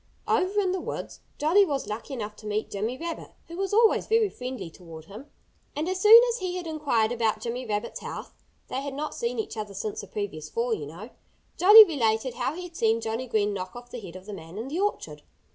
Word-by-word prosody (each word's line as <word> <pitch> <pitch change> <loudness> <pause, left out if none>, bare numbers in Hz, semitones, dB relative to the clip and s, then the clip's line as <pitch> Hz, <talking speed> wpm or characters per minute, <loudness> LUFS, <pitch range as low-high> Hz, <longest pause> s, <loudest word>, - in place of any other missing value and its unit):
Over 390 +3 +2
in 380 -3 +1
the 370 -1 -2
woods - - -6 0.2
Jolly 335 +7 +5
was 285 -7 -1
lucky 225 +6 -5
enough 210 -3 -5
to 215 - -10
meet 210 +1 -2
Jimmy 220 +5 -2
Rabbit, 335 +2 -6
who 335 - -9
was 390 +1 -2
always 445 +1 +4
very 445 -2 +3
friendly 250 - -6
toward 160 -3 -12
him. 215 - -11 0.5
And 305 +3 -2
as 370 0 -2
soon 440 +3 +10
as 480 - -4
he 365 -1 -3
had 360 -1 -4
inquired 285 -9 0
about 225 -3 0
Jimmy 240 +2 -4
Rabbit's 210 -1 -3
health - - -7 0.3
(they 265 - -3
had 280 -1 -5
not 300 +2 -4
seen 235 +1 -3
each 220 - -3
other 210 -2 -5
since 210 +2 -4
the 200 - -11
previous 180 -7 -5
fall, 235 0 -1
you 150 -9 -4
know), 180 - -10 0.4
Jolly 420 +4 +10
related 245 - 0
how 255 +4 -2
he 360 - -6
had 350 -2 -10
seen 225 -3 +2
Johnnie 225 +3 -3
Green 210 -3 +1
knock 185 0 -6
off 245 0 -11
the 245 - -6
head 185 -4 -10
of 185 0 -10
the 210 - -7
man 165 0 -10
in 230 +5 -5
the 320 +5 -3
orchard. 415 +1 -2
240 Hz, 230 wpm, -26 LUFS, 210-335 Hz, 0.5 s, soon